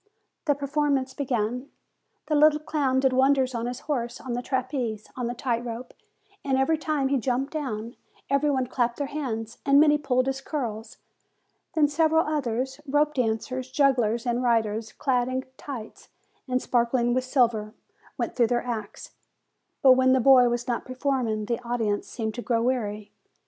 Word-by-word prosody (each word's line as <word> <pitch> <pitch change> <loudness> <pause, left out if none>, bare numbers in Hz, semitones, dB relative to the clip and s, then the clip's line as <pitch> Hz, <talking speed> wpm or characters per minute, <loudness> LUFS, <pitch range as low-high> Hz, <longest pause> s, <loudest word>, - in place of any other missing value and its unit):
The 290 -3 +3
performance 280 -2 0
began. 250 -1 -2 0.6
The 310 - -2
little 300 0 +5
clown 280 -4 0
did 265 -1 +2
wonders 265 0 +3
on 235 0 -2
his 245 0 -5
horse, 245 -5 -3
on 255 - -5
the 245 - -2
trapeze, 250 -4 -2
on 250 -2 -2
the 240 - -3
tight 240 -2 -1
rope; 240 +1 -6 0.5
and 270 -2 +1
every 300 +4 +2
time 305 -3 -1
that 265 - 0
he 275 - +2
jumped 255 +4 -1
down, 235 -6 -4 0.3
every 280 +2 +2
one 260 -3 +1
clapped 240 -1 -1
their 285 - -1
hands, 235 -6 -4
and 280 0 +5
many 295 0 +5
pulled 255 -3 +1
his 270 0 -2
curls. 235 -7 -5 0.8
Then 305 -2 +4
several 320 +2 +2
others, 265 -2 -2
rope 295 +2 +2
dancers, 255 +1 -2
jugglers, 255 -4 +2
and 240 0 0
riders, 225 -2 0
clad 250 -3 0
in 260 +1 -2
tights, 255 -6 -8 0.4
and 255 0 +1
sparkling 240 0 +1
with 255 +1 +1
silver, 235 -5 +1 0.4
went - - -3
through 235 -2 +3
their 240 +1 0
acts; 220 -4 -5 0.7
but 265 - +8
when 260 0 +5
the 260 - +4
boy 250 -1 +6
was 240 +1 -2
not 240 -2 -1
performing, 255 -5 -1
the 235 +2 -2
audience 225 -4 -1
seemed 220 -2 -4
to 240 - -5
grow 230 -1 0
weary. 215 -5 -2
255 Hz, 170 wpm, -26 LUFS, 235-275 Hz, 0.8 s, but